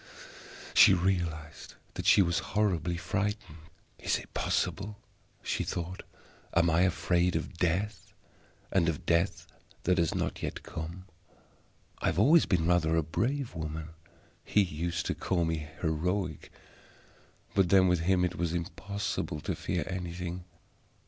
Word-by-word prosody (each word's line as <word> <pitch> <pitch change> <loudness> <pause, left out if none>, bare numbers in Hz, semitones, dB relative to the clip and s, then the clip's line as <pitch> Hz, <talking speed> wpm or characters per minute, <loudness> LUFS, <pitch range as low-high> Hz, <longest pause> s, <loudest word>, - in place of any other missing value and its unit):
She 95 - +8
realized 85 -5 -2 0.2
that - - -4
she 100 - +7
was 85 -1 +1 0.2
horribly 90 -5 +1
frightened. 105 -2 -3 0.4
"Is - - +1
it - - -11
possible?" 105 +1 -1 0.5
she - - -1
thought. 90 +2 -4 0.5
"Am 85 0 +4
I 80 +2 +3
afraid 90 -1 +2
of 85 +2 -4
Death, 95 +2 -1 0.6
and 85 -3 +3
of 75 - -4
Death 85 +3 +1 0.4
that 90 0 +2
has 85 -2 +1
not - - -2
yet - - -4
come? 85 +3 -7 0.9
I - - -1
have 80 - +1
always 150 - +6
been 85 -4 +2
rather 85 -2 +3
a 80 - +2
brave 125 - -1
woman; 80 0 -5 0.5
He 105 - +3
used 85 0 -3
to - - 0
call 85 -3 0
me 80 -2 -2
heroic; 85 +1 -1 1.0
but 95 -3 +3
then 95 0 +6
with 90 -1 +3
him 90 +2 +2
it 90 - -3
was 85 -1 -1
impossible 100 -1 -3
to - - -2
fear 85 0 -2
anything. 90 -1 -5
90 Hz, 140 wpm, -30 LUFS, 80-95 Hz, 1.0 s, She